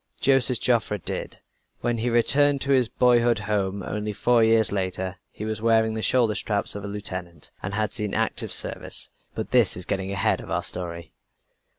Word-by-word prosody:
Joseph 130 -2 +3
Joffre 115 -4 +1
did. 90 - -4 0.4
When 120 -1 -1
he 120 +2 0
returned 140 +4 +4
to 140 - 0
his 130 -4 +3
boyhood's 120 -3 +3
home, 100 -2 -2
only 105 +2 -4
four 120 +2 +3
years 110 -1 +4
later, 95 -1 -3
he 105 - -7
was 110 0 -4
wearing 110 -1 +2
the 110 - -3
shoulder 120 -2 +2
straps 105 -1 +1
of 100 - -7
a - - -5
lieutenant, 90 -6 -5
and 95 +1 -4
had 110 -1 -1
seen 105 -4 -3
active - - 0
service. - - -1 0.3
But - - -5
this - - +4
is 90 - -6
getting 95 0 -3
ahead 100 +2 0
of - - -11
our - - -1
story. 85 -2 -5
105 Hz, 185 wpm, -24 LUFS, 100-120 Hz, 0.4 s, returned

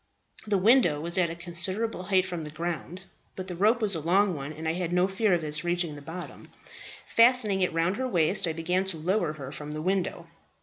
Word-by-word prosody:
The 205 -1 +2
window 190 - +4
was 170 +3 -3
at 175 -2 +2
a 165 - -5
considerable 180 +5 -2
height 185 0 +2
from 175 -3 -5
the 150 - -7
ground; 170 +3 -5 0.3
but 185 0 -6
the 180 - -5
rope 220 +6 +2
was 205 -2 +2
a 165 - -1
long 185 +5 +2
one, 140 -1 -6
and 160 +1 -6
I 160 - +1
had 175 -1 -3
no 180 +1 +3
fear 195 +2 0
of 170 - -3
its 150 0 -3
reaching 175 -2 -1
the 145 - -10
bottom. 165 +4 -9 0.6
Fastening 230 -5 +4
it 180 - +1
round 165 +4 0
her 260 - -1
waist, 180 -3 +3
I 165 - -1
began 180 +3 0
to 190 -4 -2
lower 175 0 0
her 135 -3 -8
from 150 0 -7
the 155 - -4
window. 185 -2 -1
175 Hz, 225 wpm, -27 LUFS, 160-195 Hz, 0.6 s, window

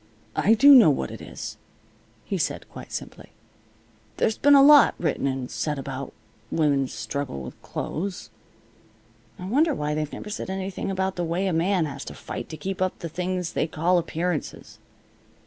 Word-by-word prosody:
"I 220 +3 +4
do 285 +5 +8
know 235 - +9
what 140 - -1
it - - -9
is," - - -7 0.7
he - - -2
said, - - -2
quite - - -10
simply. - - -8 0.8
"There's 220 - +1
been 285 0 +6
a 275 - +8
lot 290 0 +7
written 155 -4 -1
and 130 -2 -3
said 150 -2 -2
about 135 0 -5 0.4
women's 140 -4 +1
struggle 140 - -4
with 65 - -10
clothes. 185 +3 -5 1.1
I 180 - -8
wonder 290 - +2
why 150 0 -2
they've 150 -1 -2
never 210 - -7
said 210 - -5
anything 190 0 -4
about 190 0 -1
the 175 - -1
way 170 +3 -1
a 190 - 0
man 175 +1 +2
has 140 -2 -6
to - - -8
fight - - -7
to 155 - -7
keep 190 +4 -5
up 185 0 0
the 170 - -6
thing 180 +2 -2
they - - 0
call 175 +3 +2
appearances. 170 -1 -4
175 Hz, 175 wpm, -25 LUFS, 150-195 Hz, 1.1 s, know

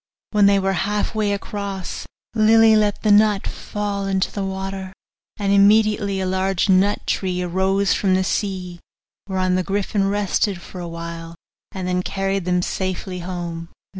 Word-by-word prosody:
When 210 -2 +5
they 200 0 +5
were 195 0 +1 0.2
half 210 +2 -1
way 215 -2 0
across 200 -2 -5 0.3
Lily 225 0 +5
let 210 -1 +1
the 215 - +3
nut 205 -1 +4
fall 205 -1 -4
into 190 -1 0
the 200 - -3
water, 190 0 -5 0.4
and 200 -1 0
immediately 205 -1 +4
a 190 - -1
large 190 +1 0
nut 195 +2 +3
tree 185 -2 -1
arose 190 +2 +1
from 190 -2 +2
the 190 - +2
sea, 185 -3 -3 0.5
whereon 185 -1 0
the 185 - +2
griffin 195 +1 0
rested 200 -1 0
for 180 +1 -9
a 175 - -5
while, 165 0 -7 0.4
and 190 -3 -5
then 180 0 0
carried 195 0 -2
them 180 -1 +1
safely 185 0 -3
home. 170 -2 -5
195 Hz, 160 wpm, -21 LUFS, 185-205 Hz, 0.5 s, When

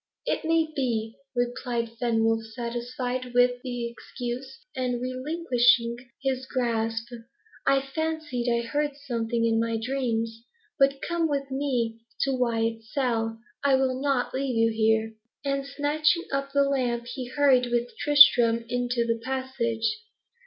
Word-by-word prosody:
"It - - -1
may 325 -1 +1
be," 230 -4 -1 0.2
replied 240 -1 -1
Fenwolf, 225 -1 +2
satisfied 245 +1 -4
with 245 0 +4
the 245 -2 -3
excuse, 250 +5 -7
and 250 -2 -1
relinquishing 250 -3 +2 0.3
his 260 -1 -1
grasp. 230 -3 -1 0.6
"I 275 0 +4
fancied 295 -4 -2
I 235 0 +1
heard 290 +4 -1
something 235 -4 -1
in 225 -1 +2
my 230 0 0
dreams. 230 -2 -2 0.4
But 275 0 +3
come 340 -1 +1
with 275 -1 -2
me 250 -5 -1 0.2
to 275 - +2
Wyat's 225 -3 -1
cell. 225 -4 0 0.3
I 280 -1 +5
will 260 -1 0
not 275 -3 0
leave 265 -2 -1
you 225 0 +3
here." 220 0 +2 0.3
And 275 0 -1
snatching 300 +4 +1
up 275 0 -2
the 280 0 +4
lamp, 250 -4 0
he 250 +1 -5
hurried 255 -1 +3
with 240 0 -1
Tristram 245 -6 +6
into 245 -1 0
the 230 -1 -1
passage. 260 - -1
245 Hz, 135 wpm, -26 LUFS, 230-275 Hz, 0.6 s, Tristram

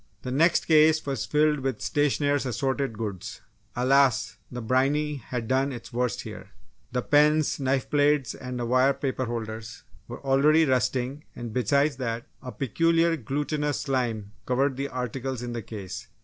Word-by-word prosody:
The 125 - -4
next 165 +6 +3
case 155 0 +5
was 135 -5 -2
filled 150 0 +2
with 130 -4 -2
stationers' 145 -1 +1
assorted 130 0 -1
goods. 105 -5 -5 0.3
Alas! 130 -1 +3
the 125 - -5
briny 140 +5 +1
had 120 -2 -5
done 135 +2 +1
its 120 -3 -9
worst 125 -1 -1
here. - - -9 0.4
The 125 -1 -1
pens, 150 +1 +3
knife 135 -1 0
blades 145 -2 +2
and 125 -2 -5
wire 130 +3 +3
paper 135 -1 -2
holders 115 -1 -6 0.2
were - - -7
already 150 +4 +4
rusting 130 +2 0
and 120 -2 -6
besides 140 +4 +2
that 115 -2 -3 0.2
a 130 -2 -7
peculiar 165 +7 +2
glutinous 145 +2 -2
slime 120 -7 -2 0.2
covered 135 +2 +1
the 140 +2 -2
articles 130 0 -4
in 120 -1 -4
the 120 - -3
case. 100 -3 -7
130 Hz, 150 wpm, -26 LUFS, 120-145 Hz, 0.4 s, case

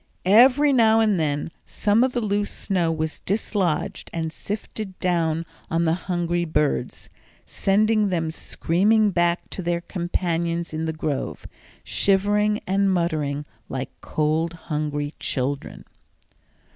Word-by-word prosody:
Every 260 +8 +6
now 225 -3 +5
and 215 -5 +3
then 150 0 -1 0.2
some 215 +3 +2
of 260 -1 +1
the 245 - 0
loose 205 -1 0
snow 180 -4 0
was 160 -1 -2
dislodged 200 -2 -1
and 165 -1 -3
sifted 210 -1 -5
down 165 -2 0 0.2
on 165 +1 +1
the 160 - +3
hungry 175 -1 -1
birds, 150 -6 -1 0.4
sending 215 +1 +2
them 165 -3 -1
screaming 205 +7 +2
back 175 -1 +1
to - - -4
their 170 -1 -1
companions 170 -2 -2
in 160 +1 -2
the 160 - -1
grove, 155 -3 -3 0.4
shivering 205 +2 +2
and 195 +1 +2
muttering 155 -5 -1 0.2
like 130 0 -4
cold, 155 +2 0
hungry 150 -2 -3
children. 135 +1 -3
175 Hz, 125 wpm, -23 LUFS, 160-205 Hz, 0.4 s, Every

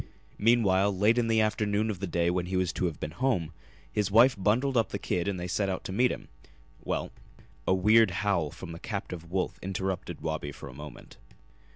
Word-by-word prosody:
Meanwhile, 100 -4 +3
late 110 +5 +4
in 115 - +1
the 110 -1 +3
afternoon 105 0 +1
of 95 - -6
the 100 - -3
day 85 0 +1
when 90 0 -1
he 95 - -3
was 90 -1 0
to - - -1
have 80 - -6
been 75 - -4
home, 90 - 0 0.4
his 105 +5 0
wife 120 +5 +6
bundled 115 +7 +1
up 115 -4 +2
the - - -3
kid 90 +1 -2
and 100 -2 -1
they 90 - -4
set 100 +2 0
out 95 - -3
to - - -5
meet 120 +6 +3
him. - - -7 0.6
Well - - -2 0.3
" - - -26
A - - +4
weird 110 +3 +5
howl 90 -3 0
from 85 +3 -9
the 85 - -8
captive 90 -6 -5
wolf 90 +1 -2
interrupted 95 -3 -3
Wabi 80 -2 -3
for 70 - -10
a 65 - -10
moment. 75 +2 -11
95 Hz, 215 wpm, -29 LUFS, 85-110 Hz, 0.6 s, wife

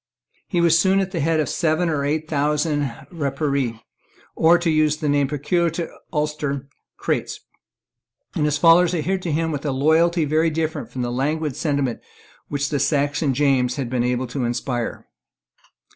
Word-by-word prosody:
He 175 -3 0
was 170 -1 +5
soon 190 +3 +3
at 190 -1 -1
the 175 - -3
head 160 +1 +1
of 155 - +1
seven 165 +1 +1
or 150 -4 0
eight 155 +2 -1
thousand 150 -1 0 0.2
Rapparees, 140 -5 -1 0.6
or, 165 +2 +5
to 170 0 -3
use 155 -1 +2
the 155 - -3
name 145 -1 +2
peculiar 150 +5 0
to 165 0 -5 0.2
Ulster, 150 -3 -2 0.3
Creaghts; - - -2 0.9
and 150 - 0
his 150 -1 +1
followers 170 +3 +5
adhered 185 +4 -1
to 175 - -3
him 160 +2 0
with 145 -2 -4
a 145 - -1
loyalty 160 +4 +3
very 155 +3 +2
different 160 -6 -3
from 125 0 -4
the 120 - -2
languid 145 +3 -1
sentiment 140 -6 -1 0.5
which 140 0 -2
the 145 - -1
Saxon 145 -1 +1
James 130 -3 +2
had 130 -4 -4
been 125 -2 +1
able 125 +1 0
to 125 +1 -4
inspire. 120 0 -3
150 Hz, 170 wpm, -22 LUFS, 140-165 Hz, 0.9 s, was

